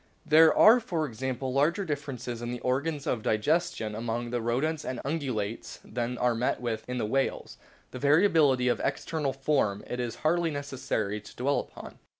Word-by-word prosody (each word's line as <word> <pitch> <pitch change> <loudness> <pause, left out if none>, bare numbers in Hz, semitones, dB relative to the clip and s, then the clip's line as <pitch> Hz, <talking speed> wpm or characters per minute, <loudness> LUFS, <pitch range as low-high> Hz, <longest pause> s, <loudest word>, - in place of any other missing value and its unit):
There 160 +1 +7
are, 230 +3 +8
for 175 -10 -2
example, 130 +1 -4
larger 165 +9 +2
differences 135 -6 -4
in 120 - -4
the 120 0 -4
organs 140 +3 -1
of 115 - -1
digestion 110 0 0
among 115 +2 -3
the 120 -1 -1
Rodents 135 +7 -1
and 130 - -4
Ungulates 130 -8 -3
than 120 0 -3
are 125 0 +2
met 115 +2 0
with 115 -3 -3
in 125 - -2
the 115 - -1
whales; 135 +5 -2 0.3
the 130 - -7
variability 145 -4 +4
of 120 - +1
external 155 -4 -1
form 135 -7 0
it 125 - -5
is 120 -2 -3
hardly 170 +1 +2
necessary 130 -8 -3
to 105 - -14
dwell 140 +3 +1
upon. - - -10
130 Hz, 170 wpm, -28 LUFS, 120-150 Hz, 0.3 s, are